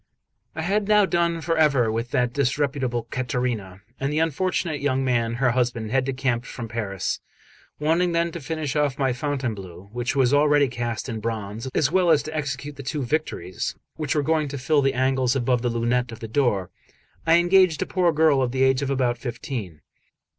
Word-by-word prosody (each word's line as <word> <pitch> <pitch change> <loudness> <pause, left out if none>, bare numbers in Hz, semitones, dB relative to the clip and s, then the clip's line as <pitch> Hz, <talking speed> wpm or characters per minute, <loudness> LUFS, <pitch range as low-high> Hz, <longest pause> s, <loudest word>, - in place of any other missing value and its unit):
I 160 - -3
had 200 +4 0
now 210 -1 +5
done 170 -2 0
for 165 +2 0
ever 135 -7 +3
with 115 +2 -2
that 125 0 0
disreputable 135 -3 0
Caterina, 120 -7 -2 0.2
and 135 +1 -1
the 150 - -1
unfortunate 165 -1 0
young 135 -2 +1
man, 115 -2 +1
her 125 +1 +2
husband, 120 -3 -1
had 130 0 +2
decamped 130 -3 -1
from 120 -2 -6
Paris. 105 -5 -3 0.6
Wanting 165 +4 +2
then 170 0 +1
to 170 - -6
finish 150 0 -3
off 145 -3 +1
my 135 -3 +1
Fontainebleau, 110 - -4
which 120 +2 -2
was 135 -1 +3
already 145 0 +4
cast 120 -1 -3
in 115 -3 -4
bronze, 110 +1 -4
as 140 - +2
well 185 -2 +3
as 155 -3 +4
to 155 0 -6
execute 145 -1 -4
the - - -6
two 140 +2 -3
Victories 120 - -2 0.2
which 155 0 -2
were 150 - +2
going 155 0 +1
to 140 0 -5
fill 145 +3 +2
the 135 -1 +1
angles 130 0 +2
above 125 -1 +1
the 120 - 0
lunette 120 +1 0
of 115 - -9
the 115 - -6
door, 105 -7 0 0.6
I 165 +1 +6
engaged 175 -2 +4
a - - -7
poor 180 -2 +2
girl 155 -3 +3
of 125 -2 0
the 130 +1 +1
age 130 0 +3
of 140 - -2
about 125 -3 0
fifteen. 115 - -5
135 Hz, 195 wpm, -24 LUFS, 120-150 Hz, 0.6 s, I